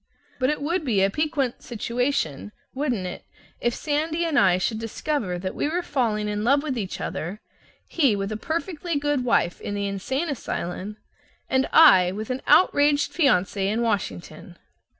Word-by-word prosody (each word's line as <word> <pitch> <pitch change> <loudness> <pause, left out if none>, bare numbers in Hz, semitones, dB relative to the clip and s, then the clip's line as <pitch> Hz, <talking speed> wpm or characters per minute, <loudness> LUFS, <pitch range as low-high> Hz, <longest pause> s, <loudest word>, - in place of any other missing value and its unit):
But 255 0 +2
it 300 -1 -2
would 335 +3 0
be 215 -8 +2
a 195 - +2
piquant 290 -2 -1
situation, 235 - -2 0.2
wouldn't 260 -8 -1
it, 180 - -6 0.4
if 240 0 0
Sandy 315 +3 -1
and 315 -4 +2
I 185 -2 +4
should 215 +4 -1
discover 225 -3 -2
that 185 +1 -4
we 290 - -1
were 350 +3 -1
falling 220 -9 -1
in 210 0 -2
love 280 +5 +3
with 280 -4 -2
each 200 -6 -4
other, 180 +6 -4 0.5
he 275 -10 +2
with 195 +1 -3
a - - -2
perfectly 330 - -3
good 290 -2 0
wife 230 -7 +1
in 205 - -4
the 200 0 -2
insane 230 - -2
asylum 210 - -4 0.5
and 265 0 +1
I 190 - +7
with 215 +4 -5
an 255 - -3
outraged 290 -4 +4
fiance 195 - +2
in 225 +3 0
Washington? 195 - -4
240 Hz, 170 wpm, -24 LUFS, 200-290 Hz, 0.5 s, I